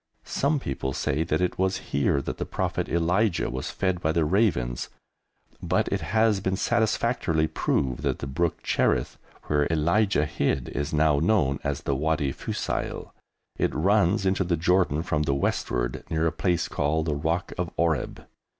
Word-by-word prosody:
Some 145 +2 0
people 65 - -3
say 70 +3 -1
that 80 +2 0
it 90 - -1
was 95 0 +1 0.2
here 70 0 +2
that - - -5
the - - 0
Prophet - - -2
Elijah 85 - +1
was 65 +1 -4
fed 95 -2 -1
by 80 - +1
the 80 -1 +1
ravens, 75 - +1 0.7
but - - +1
it - - -1
has 110 0 +2
been 95 0 -1
satisfactorily 110 -7 +1
proved 65 -4 -1
that - - 0
the - - -6
brook 80 +5 -1
Cherith, - - 0 0.2
where 75 -1 +1
Elijah 85 +2 +2
hid, 70 -4 -1
is 75 +3 -3
now 75 -1 +3
known 75 -6 +2
as - - -2
the 70 - -1
Wadi 75 0 0
Fusail. - - -4 0.5
It - - 0
runs 100 +3 +2
into 95 +1 +2
the 85 -2 0
Jordan 85 -2 +2
from 75 -3 0
the 70 -2 +1
westward, - - -1
near 80 0 0
a 80 - +2
place 85 +1 0
called 80 +2 0
the 80 - 0
rock 80 +5 -1
of 90 -2 -2
Oreb. 85 -3 -1
80 Hz, 170 wpm, -26 LUFS, 75-95 Hz, 0.7 s, now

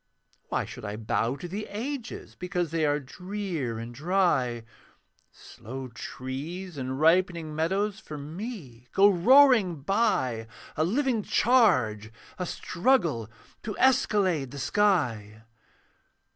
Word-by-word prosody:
Why - - -1
should - - -10
I 105 -1 -4
bow 115 +3 -1
to 175 - -7
the 200 +5 -5
Ages 245 +4 -5
Because 180 -3 -3
they 160 -2 +1
were 145 0 +1
drear 175 - -4
and 115 +1 -7
dry? 145 -7 +1 0.7
Slow 130 +3 -9
trees 140 +9 -6
and 130 -1 -4
ripening 165 -1 +2
meadows 195 +6 0
For 155 -9 -8
me 150 - -8
go 200 +1 +6
roaring 210 - +5
by, 165 - 0 0.3
A 155 - +1
living 240 - +1
charge, 130 - +2 0.3
a 180 - -2
struggle 170 - 0 0.3
To 215 - -5
escalade 195 - +2
the 140 - -9
sky. 125 - 0
170 Hz, 115 wpm, -27 LUFS, 130-205 Hz, 0.7 s, go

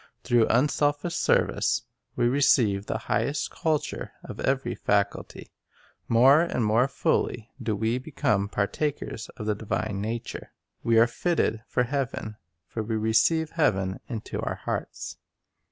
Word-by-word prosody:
Through 120 -2 +3
unselfish 145 +5 +1
service - - +2 0.3
we 120 -1 +2
receive 120 -7 +3
the - - -1
highest 145 +2 0
culture 155 -2 -2
of - - -9
every 135 0 0
faculty. 100 -1 -1 0.6
More 130 +6 +6
and 150 -9 0
more 115 +5 +3
fully 120 -4 -1
do 110 -2 -1
we 115 +4 0
become 105 -8 0
partakers 110 +3 -2
of 105 - -5
the 105 - +1
divine 105 -1 -3
nature. 115 +2 -5 0.3
We 115 -1 +3
arc 115 +1 +5
fitted 120 -9 0
for 125 - +1
heaven; 125 -5 -3 0.3
for 110 - -4
we 110 +1 -2
receive 115 +9 +2
heaven 95 - +1
into 115 -4 -5
our - - -2
hearts. - - -5
115 Hz, 135 wpm, -26 LUFS, 110-140 Hz, 0.6 s, More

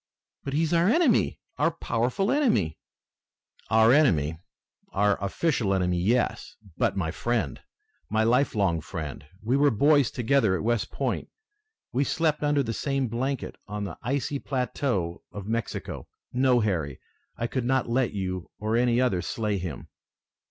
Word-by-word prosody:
"But 140 - -4
he 155 +3 +2
is 160 - 0
our 170 +3 +4
enemy! 290 -4 +3 0.2
Our 150 - +4
powerful 130 - -1
enemy!" 115 - +1 0.9
"Our 110 +2 +6
enemy! 80 - +3 0.5
Our 100 +1 +3
official 105 - +1
enemy, 90 -1 +1
yes! 115 +8 0 0.2
But - - 0
my 80 -4 -1
friend! 110 - -2 0.5
My 110 +1 +2
life 125 +3 +2
long 90 -6 +1
friend! 80 -5 -6 0.2
We 125 +5 +2
were 145 +1 +5
boys 140 +2 +4
together 120 -5 +2
at - - -3
West 120 0 0
Point! - - -2 0.6
We 130 +3 +2
slept 155 +1 0
under 145 -1 +2
the 115 -2 -3
same 135 -1 -1
blanket 130 +3 -3
on 105 0 -4
the 95 -5 -6
icy 140 +3 -1
plateaux 125 -10 -2
of 100 -2 -7
Mexico. 115 +1 -4 0.3
No, 125 -1 +3
Harry, 80 -10 -1 0.4
I 115 - -1
could 120 +1 -2
not 130 +1 +1
let 120 +1 +1
you 95 -3 -4
or 110 +1 -1
any 120 0 +3
other 110 -9 +2
slay 105 -1 -2
him!" 85 -7 -6
115 Hz, 150 wpm, -27 LUFS, 100-140 Hz, 0.9 s, Our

